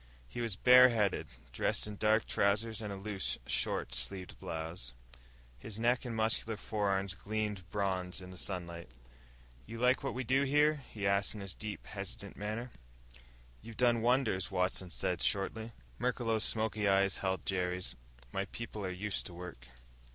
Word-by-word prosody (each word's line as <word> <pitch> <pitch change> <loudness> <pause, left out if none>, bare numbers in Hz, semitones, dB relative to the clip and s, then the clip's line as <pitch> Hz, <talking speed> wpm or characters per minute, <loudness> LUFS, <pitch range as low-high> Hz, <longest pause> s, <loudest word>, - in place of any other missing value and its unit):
He 120 - -5
was 115 -5 -1
bare 125 +4 +9
headed, 105 -5 +1 0.2
dressed - - +1
in 105 0 -5
dark 110 +2 +3
trousers 105 +2 +1
and 105 -2 -4
a - - -3
loose, 100 -1 -1
short - - 0
sleeved 95 -3 -3
blouse. 80 -5 -5 0.6
His 110 - -7
neck 120 +3 +2
and 120 -2 -3
muscular 110 0 +1
forearms 100 -3 0
gleamed 105 -2 -3
bronze 95 -3 0
in 90 -1 -9
the 90 - -10
sunlight. 85 -5 -3 0.8
"You 115 +2 -6
like 125 +3 +3
what 135 - -2
we 130 - -1
do 130 +3 +3
here?" 145 +1 +3
he 105 -2 -4
asked 100 +1 +2
in 105 - -6
his 100 -2 -6
deep, 105 -2 -6
hesitant 100 0 -6
manner. 110 +4 -4 0.9
"You've 115 0 -10
done 120 -2 +4
wonders," 120 -6 +2
Watson 90 0 0
said 90 -1 -1
shortly. 110 +3 0 0.3
Merklos' 115 -3 +1
smoky 110 -2 +1
eyes 100 0 +3
held 95 -1 -1
Jerry's. 90 -1 -1 0.4
"My 95 0 -1
people 110 +1 -6
are 95 - -1
used 95 +2 -2
to 85 - -10
work." 85 -9 -8
105 Hz, 160 wpm, -34 LUFS, 95-115 Hz, 0.9 s, bare